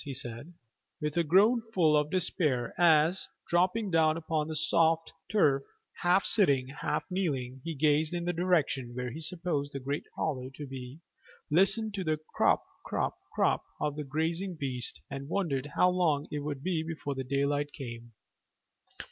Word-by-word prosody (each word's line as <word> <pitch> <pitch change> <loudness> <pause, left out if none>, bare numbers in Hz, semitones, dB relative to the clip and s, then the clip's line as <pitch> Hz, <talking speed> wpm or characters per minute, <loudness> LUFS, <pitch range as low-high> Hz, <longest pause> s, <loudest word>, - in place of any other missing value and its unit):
he 140 -2 -5
said, 120 +7 -5 0.5
with 150 0 -2
a 170 - +3
groan 205 +9 +5
full 160 -4 +4
of 150 0 +2
despair, 150 -8 +1
as, 165 +1 +4 0.2
dropping 185 +4 +1
down 160 -1 +3
upon 160 -2 -1
the 160 - -4
soft 165 +1 +2 0.2
turf, 150 -9 +3 0.4
half 180 +2 +3
sitting, 140 - +3
half 140 - -2
kneeling, 135 -9 -2
he 165 -1 -4
gazed 150 +2 +2
in 175 -1 -3
the 175 - 0
direction 155 -8 0
where 125 -1 -3
he 150 - -7
supposed 165 -4 -1
the 140 - -3
great 140 +3 -3
hollow 130 -5 -2
to 150 - -6
be, 130 +1 -8 0.5
listened 200 +6 +4
to 195 -2 -2
the 155 -2 0 0.2
crop - - +3 0.2
crop - - -1 0.2
crop - - +2 0.2
of 150 -1 -1
the 150 - -4
grazing 165 +6 -2
beast, 125 -3 -3
and 140 +1 -6
wondered 145 -8 -1
how 180 - +5
long 170 -6 +1
it 150 - -2
would 145 -2 -4
be 175 -2 0
before 160 -3 -4
the 135 -1 -4
daylight 140 +2 0
came. 120 -5 -8
155 Hz, 165 wpm, -30 LUFS, 140-175 Hz, 0.5 s, groan